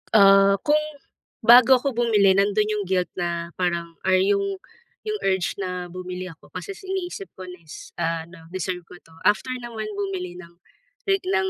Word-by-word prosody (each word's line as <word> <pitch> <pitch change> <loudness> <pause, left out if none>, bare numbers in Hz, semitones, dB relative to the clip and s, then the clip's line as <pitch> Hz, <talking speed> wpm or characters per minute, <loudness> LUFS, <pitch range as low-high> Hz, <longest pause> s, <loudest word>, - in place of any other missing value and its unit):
Ah, 195 -1 +7
kung 300 +1 +4 0.6
bago 245 +3 +8
ako 275 +2 0
bumili 225 -5 +3
nandoon 205 +2 +2
'yong 210 -1 -2
guilt 185 -1 0
na 170 -1 -2
parang 170 -2 -2
or 190 - +5
'yong 200 +1 +2 0.5
'yong 425 -1 -3
urge 190 -1 0
na 180 -2 -4
bumili 185 0 -6
ako 165 - -18
kasi 405 - -5
is 395 +1 -11
iniisip 380 +1 -4
ko 190 - -9
na 180 -1 -10
is, 160 -2 -12
ah, 165 -1 -1
ano, 165 -1 -15
deserve 185 -1 -3
ko - - -12
'to. 165 - -22 0.2
After 210 +5 +2
naman 225 -3 -6
bumili 180 -3 -4
ng 170 -1 -13 0.5
like 390 -1 +2
ng 390 0 +1
195 Hz, 180 wpm, -24 LUFS, 180-230 Hz, 0.6 s, bago